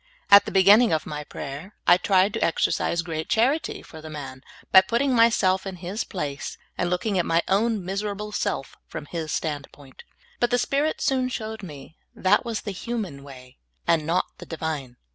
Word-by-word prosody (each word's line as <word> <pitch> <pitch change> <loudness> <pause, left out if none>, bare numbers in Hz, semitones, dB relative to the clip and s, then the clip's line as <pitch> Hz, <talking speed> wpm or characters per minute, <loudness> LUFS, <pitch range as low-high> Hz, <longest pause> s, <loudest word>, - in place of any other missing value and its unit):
At 200 0 +9
the - - -5
beginning 205 +5 +6
of 155 -1 0
my 150 0 -5
prayer, 145 +8 -8
I 175 - +7
tried 190 +2 +3
to 225 - -1
exercise 170 0 +1
great 160 -2 -4
charity 250 +7 +1
for 160 - -12
the 155 - -9
man 140 -4 -8 0.3
by 190 - +9
putting 235 +7 0
myself 205 -5 +3
in 190 - -5
his 185 +5 -4
place, 145 -6 -5 0.2
and 175 - -1
looking 185 +2 0
at 175 - +1
my 165 +1 +2
own 210 0 +1
miserable 205 +2 -3
self 135 -9 -3
from - - -7
his 160 0 -5
standpoint. 145 -3 -5 0.4
But 240 - +2
the 245 - +2
Spirit 285 +5 0
soon 260 -3 +1
showed 220 -3 -5
me 150 -4 -11 0.2
that 190 +3 +3
was 230 -2 -3
the 205 - -5
human 195 -8 -5
w^ay, 130 -2 -13 0.3
and 160 -2 +2
not 170 +2 +2
the - - -10
Divine. 150 -6 -4
185 Hz, 180 wpm, -25 LUFS, 155-220 Hz, 0.4 s, At